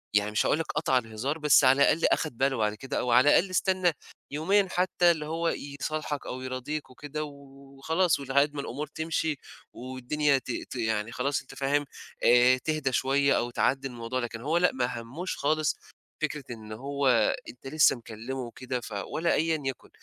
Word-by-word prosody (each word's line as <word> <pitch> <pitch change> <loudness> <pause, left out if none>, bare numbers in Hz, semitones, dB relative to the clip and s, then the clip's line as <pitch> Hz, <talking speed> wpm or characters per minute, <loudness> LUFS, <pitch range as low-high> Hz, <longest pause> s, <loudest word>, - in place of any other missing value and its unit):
يعني 105 0 +2
مش 105 - +1
هاقول 155 - +2
لك 165 - -1
قطع 150 -4 +2
الهزار، 125 +5 -2
بس 150 -2 +5
على 135 +2 +5
الأقل 165 - +4
أخَد 150 -7 0
باله 135 -1 +1
بعد 105 -1 +1
كده 130 +4 -4
أو 125 - -1
على 130 +5 +6
الأقل 185 +5 +4
استنّى 185 -1 +2 0.4
يومين 190 +6 +2
حتّى 180 -1 +3
اللي 155 -2 -3
هو 165 +2 -1 0.3
يصالحك 155 -2 -3
أو 130 - -5
يراضيك 130 +3 -4
وكده 145 +3 -6
و 140 -2 -12 0.2
وخلاص 160 +4 +2
ولحد 140 +2 +2
ما 145 - -3
الأمور 145 +3 -5
تمشي 160 0 -2 0.4
والدنيا 130 +3 0
ت 130 - -5 0.2
ت - - -7
يعني 110 -2 -1
خلاص 140 +4 -1
أنت 135 0 -14
فاهم، 140 +2 +1 0.4
آآ 125 +1 +6
تهدى 155 0 -1
شوية 140 +2 +2
أو 120 - -1
تعدّي 135 +2 0
الموضوع، 120 0 -4
لكن 115 -2 -5
هو 155 +6 +1
لأ، 180 +1 +4
ما 125 -2 -2
همّوش 145 +11 -5
خالص 155 +1 +1 0.5
فكرة 150 -2 -2
إن 110 -2 -9
هو 140 +5 -2 0.4
أنت 125 +2 -11
لسّه 155 +1 +4
مكلِّمه 120 +2 -7
وكده 125 +1 -4
ف 115 - -9 0.2
ولا 170 +2 0
أيًا 160 0 +1
يَكُن. 135 -2 -5
140 Hz, 185 wpm, -28 LUFS, 125-155 Hz, 0.5 s, على